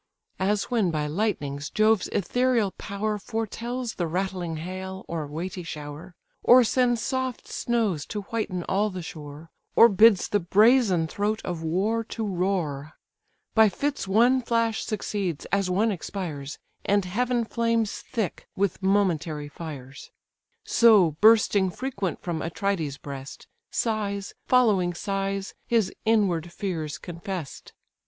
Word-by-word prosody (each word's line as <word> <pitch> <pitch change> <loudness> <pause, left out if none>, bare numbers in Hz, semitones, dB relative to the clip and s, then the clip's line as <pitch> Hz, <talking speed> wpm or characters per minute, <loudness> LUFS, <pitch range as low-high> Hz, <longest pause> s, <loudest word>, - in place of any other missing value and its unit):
As 200 +1 +1
when 220 -7 +2
by 155 -2 -1
lightnings 150 -5 -2
Jove's 215 -1 +3
ethereal 240 0 +1
power 210 +1 -2
Foretels 230 +3 -4
the 175 - 0
rattling 180 -1 -2
hail, 185 +3 -6
or 160 -3 -3
weighty 175 +5 -5
shower, 155 +2 -8 0.3
Or 250 +1 +7
sends 245 0 +2
soft 260 0 -3
snows 215 -11 -1
to 210 - -4
whiten 195 -4 -3
all 205 +4 +1
the 185 -3 -6
shore, 155 0 -9 0.2
Or 235 - +8
bids 210 -1 +5
the 205 - +1
brazen 200 -1 +4
throat 205 +6 -1
of 175 -3 -3
war 195 +8 0
to 225 0 -4
roar; 175 -7 -2 0.6
By 220 -1 +6
fits 280 +6 -2
one 240 +6 +4
flash 230 -2 0
succeeds 195 -6 -3
as 195 -2 +1
one 210 +5 +2
expires, 160 -7 -5 0.3
And 200 -1 +2
heaven 240 +5 0
flames 230 -2 0
thick 220 -6 -4
with 195 -2 -1
momentary 170 -6 +1
fires: 140 -4 -9 0.5
So 215 -8 +5
bursting 215 -3 +5
frequent 200 -4 -4
from 170 -3 -2
Atrides' 165 -4 -2
breast, 135 -2 -8 0.2
Sighs 200 -3 -2
following 205 -9 +3
sighs 195 +1 -2
his 225 -5 +2
inward 190 -7 +2
fears 160 -6 -3
confess'd. 175 -2 -7
195 Hz, 130 wpm, -26 LUFS, 170-220 Hz, 0.6 s, Or